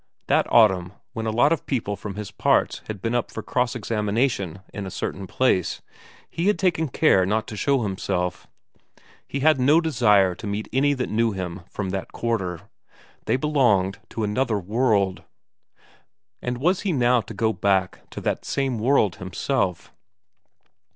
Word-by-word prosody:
That - - +1
autumn, 95 -5 +4 0.2
when 115 -2 -3
a - - 0
lot 140 +8 +4
of 165 - -5
people 110 -6 -1
from 100 -1 -7
his 105 -1 -6
parts 100 - +1
had 105 -3 -6
been 115 - -1
up 120 -1 0
for 110 - -7
cross 125 +1 0
examination 105 -4 -1
in 100 -2 -5
a - - -4
certain 95 +1 -4
place, 95 -8 0 0.4
he 170 +3 -2
had 210 - +3
taken 170 -4 +1
care 125 -8 +3
not 105 +4 0
to 110 - -6
show 130 +5 +1
himself; 95 -3 -2 0.8
he 140 - -4
had 155 -1 +4
no 145 +6 +5
desire 105 - +3
to 105 - -8
meet 105 +2 -3
any 140 +2 +3
that 130 - -3
knew 115 0 +1
him 90 -1 -5
from 95 -3 -4
that 95 0 -4
quarter; 95 -8 -2 0.6
they - - +2
belonged 120 -10 +2
to 115 - -4
another 105 +2 0
world. 100 -1 +1 1.2
And 125 0 -3
was 175 +8 +1
he 200 - -1
now 125 -3 +3
to 110 - -10
go 110 +2 +1
back 95 -1 0
to - - -7
that - - -2
same 135 -4 -1
world 110 - +2
himself? 95 - -2
110 Hz, 165 wpm, -24 LUFS, 95-130 Hz, 1.2 s, no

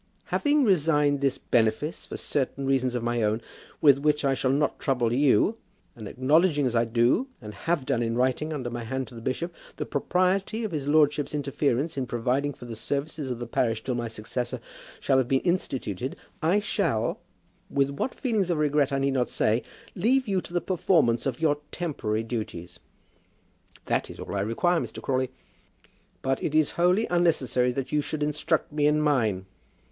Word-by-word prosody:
"Having 295 -1 +3
resigned 150 - +3
this 135 -1 +1
benefice 115 +7 0
for - - -6
certain 140 -1 -2
reasons 130 -2 +1
of 120 - -2
my 120 0 0
own, 110 +1 +1 0.4
with 140 -3 +6
which 150 0 +1
I 135 - +3
shall 130 0 0
not 140 +2 +1
trouble 125 -4 +1
you, 140 - +3 0.4
and 110 -3 -8
acknowledging 145 - +3
as 125 -2 0
I 115 0 +3
do, 120 - +2
and 105 0 -9
have 145 +7 -1
done 130 -4 0
in 115 0 -1
writing 130 +5 +1
under 130 -5 -3
my 120 0 -4
hand 130 +3 -3
to - - -15
the 115 - -9
bishop, 165 +9 -3 0.2
the - - -3
propriety 185 +8 0
of 215 - -3
his 145 -4 -3
lordship's 150 -1 +3
interference 140 +1 -1
in 130 - -2
providing 125 +4 0
for 125 - -11
the 115 -1 -6
services 140 +4 -3
of 125 - -2
the 120 - -5
parish 115 -1 0
till 130 - -2
my 120 -1 -2
successor 115 +2 -4 0.4
shall 130 - +3
have 130 - +1
been 135 +1 +2
instituted, 130 - -2 0.3
I 170 +6 +3
shall, 165 - -1 0.5
with 140 0 +1
what 140 - -3
feelings 220 -8 0
of 170 - +1
regret 150 -2 +2
I 135 - +1
need 135 0 +1
not 125 -2 +1
say, 110 +3 +1 0.3
leave 250 +7 +2
you 190 -2 +1
to - - -11
the 175 - +1
performance 160 -10 +2
of 130 -2 -3
your 150 -2 +2
temporary 115 -11 -2
duties." 90 -7 -5 1.1
"That - - 0
is - - -10
all - - -6
that - - -6
I - - +1
require, 165 - +1
Mr. - - -5
Crawley." 130 -1 0 0.9
"But 135 0 0
it 155 - -2
is 155 -2 +3
wholly 180 +6 +3
unnecessary 130 -8 +2
that 135 0 -4
you 150 - +2
should 150 +1 -3
instruct 150 +2 0
me 150 -1 +2
in 150 +1 +3
mine." 115 -11 +1
140 Hz, 190 wpm, -26 LUFS, 120-155 Hz, 1.1 s, with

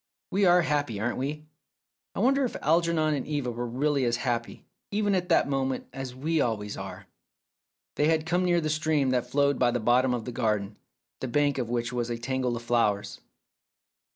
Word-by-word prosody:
We 195 +1 +2
are 175 -1 +5
happy, 145 -9 -1
aren't 120 +4 -1
we? 150 +3 -4 0.7
I - - -1
wonder 270 +4 +3
if 250 - -2
Algernon 165 -1 +2
and 140 -3 -3
Eva 145 -5 -2
were 120 +1 -4
really 140 +3 0
as 120 -1 +2
happy, 120 -2 -2 0.2
even 205 0 +1
at 180 -1 0
that 165 - +4
moment, 135 -2 -1
as 130 -1 -6
we 155 +4 0
always 105 -4 -2
are! - - -8 0.4
" - - -65
They 150 - +3
had 160 -1 +2
come 175 +2 +1
near 175 -1 +3
to - - +2
the 155 - -1
stream 155 -3 +1
that 125 -1 0
flowed 140 0 +2
by 125 - +4
the 120 0 0
bottom 125 +2 +3
of 115 -3 -5
the 125 - -4
garden, 105 -4 -1 0.4
the 130 - -3
bank 145 +2 +1
of 120 -2 -2
which 120 0 -2
was 120 -1 -2
a 120 - -2
tangle 125 0 -1
of 115 - -8
flowers. 115 -4 0
130 Hz, 205 wpm, -27 LUFS, 120-155 Hz, 0.7 s, are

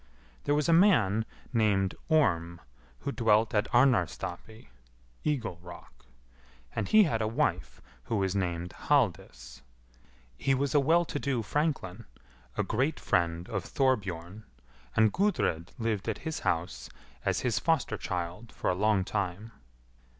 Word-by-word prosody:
There 145 - +2
was 150 -1 +1
a 165 - +4
man 115 - +4 0.3
named 100 -4 +2 0.2
Orm, 85 - +2 0.4
who 140 - -3
dwelt 110 -2 +2
at 105 +2 0
Arnarstapi 120 - 0 0.5
(eagle 115 - -2
rock), 85 0 -13 0.7
and - - -1
he 215 -1 +6
had 130 - 0
a 110 - +1
wife 110 - -1 0.2
who 115 - -2
was 95 -2 0
named 90 -2 -2
Halldis. 85 - -1 0.8
He 135 - +2
was 140 +1 -1
a 145 - +5
well 165 +5 +3
to 145 - -4
do 130 -6 -1
franklin, 145 - -2 0.5
a - - +2
great 135 +7 0
friend 85 0 0
of 100 -4 -3
Thorbjorn, 105 -7 -1 0.5
and 110 -1 +4
Gudrid 175 - 0
lived 115 -3 -2
at 110 - -2
his 160 -1 -3
house 80 -8 -2 0.3
as - - 0
his 115 -5 0
foster 140 -3 +1
child 90 +3 -5
for - - -1
a - - +1
long 100 +1 +2
time. 100 +2 -3
110 Hz, 140 wpm, -29 LUFS, 90-135 Hz, 0.8 s, he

